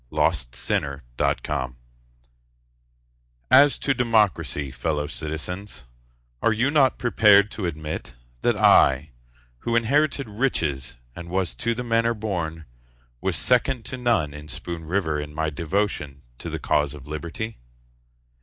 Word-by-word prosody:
John - - +3 0.3
Hancock 70 -4 -1
Otis 65 -1 -2 1.8
As 140 +2 +7
to 140 - +1
democracy, 105 - +1
fellow 75 -1 -2
citizens, 80 +3 -5 0.6
Are 115 - +3
you 120 +6 +1
not 135 -4 +4
prepared 105 -4 +5
to 95 -5 -3
admit 75 -6 -5 0.3
That - - +2
I, 70 +2 +5 0.5
who 115 - -1
inherited 140 +4 +2
riches 80 - -1 0.2
and 85 0 -8
was 95 -1 -1
to 115 -2 -1
the 125 - -3
manor 115 0 +1
born, 85 -7 -3 0.6
Was - - 0
second 125 -1 +2
to - - -3
none 115 - +1
in 75 +1 -10
Spoon 80 +2 -6
River 80 -3 0
In 75 0 -7
my 80 0 -1
devotion 75 -4 -2 0.2
to - - -5
the - - -3
cause 75 -1 0
of 70 -2 -12
Liberty? 85 +9 -5
90 Hz, 130 wpm, -24 LUFS, 75-115 Hz, 1.8 s, As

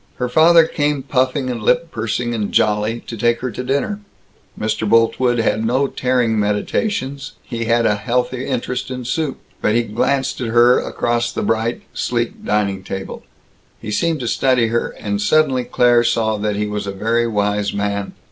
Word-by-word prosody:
Her 125 - -2
father 165 +4 +6
came 145 -3 -1
puffing 130 0 0
and 120 -2 -5
lip 165 +10 +1
pursing 115 +2 -2
and 105 -3 -2
jolly, 105 +2 +1
to 115 - -8
take 120 +1 +1
her 130 -1 -3
to 125 - -5
dinner. 140 +11 -1 0.6
Mr. 110 0 -1
Boltwood 120 +2 +3
had 110 -1 +1
no 130 +5 +2
tearing 125 -4 0
meditations; 135 - -2
he 115 -2 -4
had 115 +1 +2
a 105 - +4
healthy 125 +3 -1
interest 125 -1 -3
in 125 -1 -5
soup. 150 +3 -2 0.2
But 105 - +2
he 120 - +3
glanced 130 +5 -1
at 120 - -2
her, 120 +2 +5
across 120 0 -1
the - - -3
bright, 115 +1 -1
sleek 120 -1 -2
dining 100 -2 0
table; 95 0 -6 0.6
he 105 - -6
seemed 160 +6 0
to 120 - -3
study 125 -1 +2
her; 120 +1 0
and 100 -1 -3
suddenly 135 0 +2
Claire 120 -1 +3
saw 110 -2 +1
that 105 0 -1
he 105 +1 -1
was 105 -1 -4
a - - -2
very 115 +4 0
wise 105 -2 0
man. 100 0 -2
120 Hz, 175 wpm, -19 LUFS, 105-130 Hz, 0.6 s, father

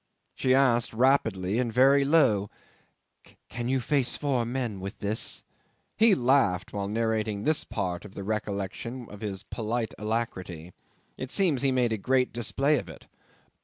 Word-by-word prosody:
'She 130 0 +2
asked 120 -4 +3
rapidly 110 -5 +2
and 120 -2 0
very 135 +4 +5
low, 125 -10 +3 1.0
"Can 120 0 -4
you 135 0 +2
face 130 0 0
four 130 -5 0
men 120 -5 -3
with 95 +2 -6
this?" 105 +2 -2 0.5
He 220 -2 +5
laughed 120 - +2
while 100 -1 -2
narrating 110 -1 -1
this 155 +3 +1
part 90 -1 -3
at 105 - -12
the 100 - -6
recollection 105 +3 -4
of 105 - -11
his 100 -3 -5
polite 115 +1 -3
alacrity. 95 -6 -4 0.4
It 130 - -5
seems 170 -8 +2
he 135 -1 +3
made 125 -3 +1
a 110 - -2
great 130 +3 +1
display 135 +5 +1
of - - -9
it. - - -12
115 Hz, 155 wpm, -27 LUFS, 105-130 Hz, 1.0 s, very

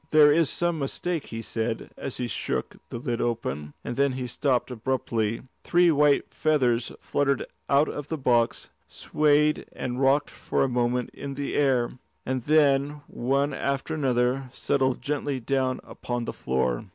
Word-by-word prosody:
"There 150 -1 +7
is 160 -2 +3
some 175 0 0
mistake," 160 +4 -2
he 115 0 -6
said 115 0 -3
as 135 - -5
he 125 - -2
shook - - -3
the - - -5
lid 120 0 -2
open, 75 - -3
and - - -4
then 140 0 +2
he 130 0 -3
stopped 130 0 0
abruptly. 115 -2 -1 0.2
Three 175 0 +4
white 145 -1 +3
feathers 125 -7 +1
fluttered 140 -1 0 0.2
out 140 +2 +4
of 145 -1 -5
the 160 - -3
box, 120 -4 +1 0.2
swayed 150 0 +2
and 125 +1 -4
rocked 140 +2 +3
for - - -1
a - - +2
moment 125 0 0
in 140 -1 -6
the 140 0 -3
air, 130 -3 +1 0.3
and 130 0 -1
then, 145 0 +3
one 140 +3 0
after 140 +3 -2
another, 130 -2 +1
settled 130 -2 0
gently 145 -2 -1
down 130 +1 0
upon 120 -1 -4
the - - -4
floor. 65 -2 -1
135 Hz, 160 wpm, -26 LUFS, 120-145 Hz, 0.3 s, There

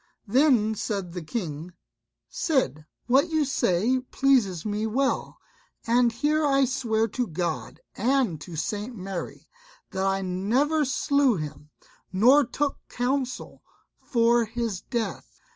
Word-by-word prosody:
Then 240 -2 +3
said 195 -4 -3
the 180 - -5
King, 165 -2 -5 0.5
"Cid, 260 - -1 0.2
what 270 +7 +3
you 315 -2 +1
say 245 -1 +1
pleases 250 - +1
me 210 +1 -1
well; 265 +5 -1 0.5
and 235 +1 +3
here 300 +6 +1
I 275 -2 +3
swear 230 -4 0
to 245 +3 -2
God 175 0 -3 0.2
and 245 - +1
to 170 -1 -8
St. 210 +9 -3
Mary, 190 -3 -6 0.4
that 190 0 -2
I 195 0 0
never 245 +12 +1
slew 275 -1 +2
him, 150 -2 -7 0.4
nor 250 +10 +6
took 280 +3 -2
counsel 255 +1 -2 0.4
for 235 -1 +3
his 225 -4 -3
death. 235 -3 -4
235 Hz, 125 wpm, -26 LUFS, 190-270 Hz, 0.5 s, nor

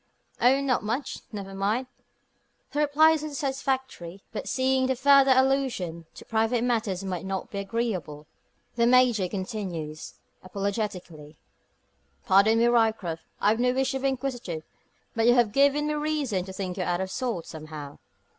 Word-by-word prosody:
"Oh, 265 +3 +5
not 265 -3 +1
much 240 +6 -3
never 195 -3 -7
mind." 205 +6 0 0.9
The 295 - -2
reply 300 +2 +5
is 320 -2 0
little 305 -1 -6
satisfactory. 265 - -3
But 220 - -5
seeing 260 0 +1
that 260 -1 0
further 275 0 +6
allusion 255 -12 0
to - - -12
private 225 +2 +1
matters 220 -6 -1
might 185 -2 -4
not 190 0 -4
be 200 - -4
agreeable, 195 -8 -3 0.5
the 235 0 +3
Major 245 -6 +4
continues, 185 -6 -5 0.3
apologetically 185 -6 -4 0.9
"Pardon 200 +4 +5
me, 230 - +4
Ryecroft. 220 -8 +1 0.2
I've 215 +2 +2
no 250 0 +2
wish 265 0 0
to 265 - -2
be 275 - 0
inquisitive; 245 -11 -3 0.5
but 225 0 +2
you 240 - +6
have 240 -4 +3
given 280 +4 +3
me 300 - 0
reason 295 -11 -1
to 190 - -8
think 185 -1 -5
you 185 - -1
out 175 0 -1
of 190 0 -3
sorts, 235 -10 -3
somehow. 155 -2 -9
225 Hz, 155 wpm, -26 LUFS, 185-265 Hz, 0.9 s, further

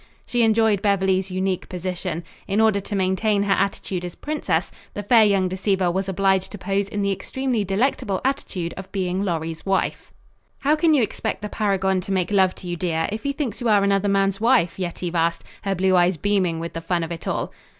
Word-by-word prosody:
She 240 - 0
enjoyed 220 -3 +3
Beverly's 190 -2 +1
unique 185 0 -2
position. 180 -2 -4 0.2
In 200 +2 0
order 220 -2 +4
to 200 +1 -5
maintain 200 +2 +1
her 200 -1 +2
attitude 195 -2 -1
as 175 -1 -6
princess, 195 - -2 0.2
the 205 - -4
fair 225 +2 +6
young 200 -3 +3
deceiver 185 -1 0
was 190 +2 -2
obliged 190 0 +1
to - - -5
pose 195 +1 -1
in 205 -1 -2
the 200 - +1
extremely 250 +3 -2
delectable 195 -1 0
attitude 185 -11 -2
of 190 0 -8
being 185 -1 -1
Lorry's 165 -3 -3
wife. 195 0 -1 0.5
"How 290 +2 +3
can 315 0 +3
you 265 - +4
expect 210 - -3
the 210 - -3
paragon 195 -3 0
to 195 - -6
make 185 0 0
love 190 -2 +3
to 180 - -10
you, 175 - -2
dear, 165 -2 -1
if 215 +1 -4
he 280 - -1
thinks 275 -4 -4
you 240 - +1
are 205 -2 +4
another 200 0 +2
man's 195 0 +1
wife?" 230 -8 +3
Yetive 175 -1 -3
asked, 170 0 0 0.2
her 195 -1 -1
blue 190 +1 +2
eyes 175 0 +3
beaming 185 -3 +1
with 165 +1 -5
the 165 - -5
fun 170 0 -1
of 165 - -5
it 165 - -6
all. - - -2
195 Hz, 210 wpm, -23 LUFS, 180-205 Hz, 0.5 s, fair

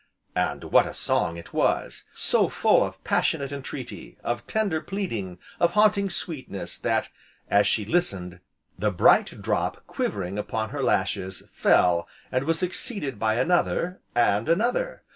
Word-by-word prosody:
And - - -1
what - - +4
a - - -7
song 85 - 0
it 85 - -11
was! - - 0
so - - +2
full - - +3
of - - -6
passionate 140 -1 0
entreaty, 140 -2 -7
of 120 0 -3
tender 200 -8 0
pleading, 115 - -4 0.2
of 170 0 +3
haunting 210 -1 +4
sweetness, 150 - -5
that, - - 0 0.4
as 100 0 +5
she 105 +1 +1
listened, 95 - 0 0.4
the 105 - +2
bright 95 - +3
drop - - -1
quivering 100 0 -3
upon 110 +1 -3
her 145 - -3
lashes, 95 -5 0
fell 85 -1 +3 0.2
and 130 +1 0
was 165 +1 +2
succeeded 175 - -2
by 110 0 +1
another, 175 +6 +1 0.2
and 115 -1 +2
another. 240 - 0
125 Hz, 145 wpm, -25 LUFS, -, 0.4 s, as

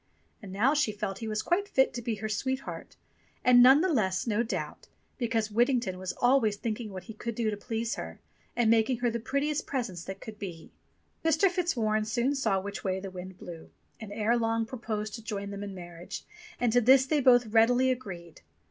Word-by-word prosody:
And 200 -3 -9
now 225 +9 +3
she 295 -7 +2
felt 205 -2 -4
he 225 - -5
was 215 0 -2
quite 390 +4 +1
fit 265 -9 +2
to 240 - -4
be 235 -1 -2
her 215 +1 -4
sweetheart, 260 +5 -4 0.5
and 245 -1 +7
none 265 +4 +8
the 365 -2 +1
less, 190 -7 +1
no 225 -1 +1
doubt, 235 - -4 0.3
because 225 -3 0
Whittington 235 -4 +1
was 185 -1 -3
always 245 -4 +3
thinking 220 +1 -4
what 185 -3 -7
he 220 - -9
could 230 +1 -5
do 225 -2 0
to - - -2
please 225 +2 -3
her, - - -7 0.4
and 230 -2 +3
making 230 +2 +3
her 240 -1 +2
the 235 - -2
prettiest 280 +5 -1
presents 215 -11 -3
that 195 0 -6
could 215 -1 -10
be. 170 -5 -8 0.5
Mr. 325 +4 +3
Fitzwarren 230 -12 0
soon 240 +5 0
saw 220 -8 +1
which 200 +1 -6
way 190 -1 -1
the 195 0 -7
wind 185 0 -8
blew, 170 -3 -10 0.3
and 220 -3 -8
ere 220 +3 +1
long 225 0 0
proposed 215 -3 -4
to 225 - -7
join 200 -2 -4
them 200 0 -6
in 200 -1 -6
marriage, 175 -1 -8 0.3
and 240 -2 +1
to 245 - +5
this 260 +3 +6
they 295 +1 +1
both 245 -2 +6
readily 240 +4 +4
agreed. 175 -10 -7
225 Hz, 205 wpm, -29 LUFS, 200-250 Hz, 0.5 s, none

